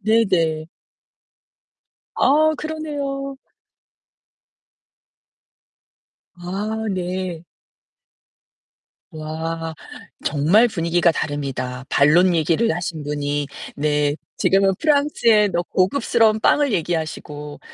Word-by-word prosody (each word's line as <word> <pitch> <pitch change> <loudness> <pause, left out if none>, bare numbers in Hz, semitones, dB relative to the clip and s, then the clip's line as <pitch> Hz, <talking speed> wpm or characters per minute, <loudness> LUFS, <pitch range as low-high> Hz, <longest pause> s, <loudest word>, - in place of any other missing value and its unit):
네네. 180 -8 +1 1.5
아, 310 +2 +4
그러네요. 285 -3 -4 3.0
아, 205 +5 -4
네. 180 -2 -4 1.7
우와 160 +1 -5 0.5
정말 165 +11 +4
분위기가 170 -3 +1
다릅니다. 135 -4 -4
반론 170 +5 +4
얘기를 165 +7 +1
하신 170 -3 -4
분이 145 0 -2 0.3
네 145 0 +1 0.2
지금은 195 0 +3
프랑스의 280 -9 +3
럭 175 0 -2
고급스러운 220 +2 +2
빵을 285 -1 +3
얘기하시고 155 -4 -4
175 Hz, 175 characters per minute, -21 LUFS, 155-220 Hz, 3.0 s, 아